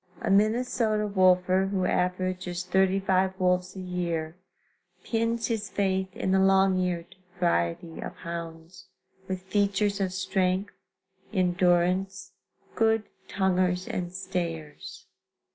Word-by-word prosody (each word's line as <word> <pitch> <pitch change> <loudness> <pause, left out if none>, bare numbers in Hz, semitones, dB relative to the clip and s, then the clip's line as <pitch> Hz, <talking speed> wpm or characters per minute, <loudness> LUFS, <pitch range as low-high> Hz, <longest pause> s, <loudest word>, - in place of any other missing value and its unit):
A - - -1
Minnesota 215 +1 +2
wolfer 185 -1 +3
who 190 -2 -1
averages 180 0 -1
35 190 0 +1
wolves 180 0 +1
a - - -7
year 170 -3 -3 0.7
pins 230 0 0
his 220 -3 -2
faith 190 -1 -1
in 190 - -1
the 190 - +4
long 190 0 +4
eared 175 -1 -3 0.2
variety 160 - 0
of - - -6
hounds, 165 0 -8 0.4
with 185 -1 -4
features 200 +1 0
of 190 -1 0
strength, 185 +1 -1 0.6
endurance, 180 +1 +1 0.4
good 225 -1 +2 0.2
tonguers 185 -1 +1
and 175 -1 -3
stayers. 175 -5 -5
185 Hz, 110 wpm, -27 LUFS, 180-195 Hz, 0.7 s, the